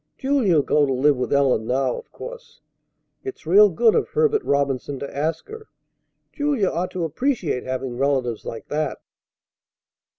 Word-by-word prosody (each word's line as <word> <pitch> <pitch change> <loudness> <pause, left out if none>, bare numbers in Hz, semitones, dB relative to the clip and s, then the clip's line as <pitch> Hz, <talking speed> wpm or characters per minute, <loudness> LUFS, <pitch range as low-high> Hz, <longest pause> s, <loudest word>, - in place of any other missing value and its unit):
Julia'll 245 - +2
go 145 0 +2
to - - -1
live 140 +3 +3
with 125 - -3
Ellen 135 -6 +2
now, 130 0 0
of - - -10
course. - - -10 0.6
It's 395 - -8
real 205 +6 +7
good 220 +6 +3
of - - +1
Herbert 450 -2 +1
Robinson 140 -1 -1
to 140 - -7
ask 155 +3 -2
her. 440 0 -10 0.7
Julia 285 - 0
ought 175 +2 -2
to 180 - -4
appreciate 180 - -1
having 130 -1 -3
relatives 130 -5 0
like 115 - -7
that." 155 +1 -2
150 Hz, 155 wpm, -22 LUFS, -, 0.7 s, real